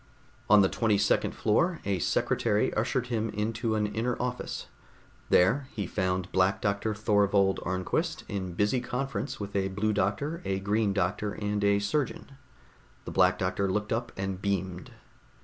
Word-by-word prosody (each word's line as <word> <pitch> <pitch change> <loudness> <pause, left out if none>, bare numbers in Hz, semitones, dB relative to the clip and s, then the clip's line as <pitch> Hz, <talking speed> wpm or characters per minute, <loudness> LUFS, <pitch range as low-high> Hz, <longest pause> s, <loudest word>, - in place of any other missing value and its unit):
On 105 -1 +7
the - - +5
twenty 110 0 +1
second 100 - +1
floor, 170 +11 +1
a 100 -2 0
secretary 105 +5 +1
ushered 125 +3 0
him 110 0 0
into 110 +2 -1
an 105 -1 +1
inner 115 +4 -2
office. 125 0 -3 0.6
There 130 +10 +4
he 105 -3 -3
found 90 0 -1
Black 95 +1 +2
Doctor 105 +1 -1
Thorvold 100 -2 +2
Arnquist, 125 - -1
in 95 -4 -4
busy 105 +7 +1
conference 135 +3 -3
with 100 -1 -6
a 95 -1 +1
Blue 100 +3 -1
Doctor, 125 - -1
a 95 0 -1
Green 105 +1 +1
Doctor 100 +2 -1
and 105 0 -2
a 100 0 +4
surgeon. 115 +8 -2 0.7
The - - -5
Black - - +4
Doctor 100 -1 0
looked 105 +2 -1
up, 120 +1 -2
and 95 -1 -3
beamed. 95 -3 -2
105 Hz, 155 wpm, -28 LUFS, 95-115 Hz, 0.7 s, On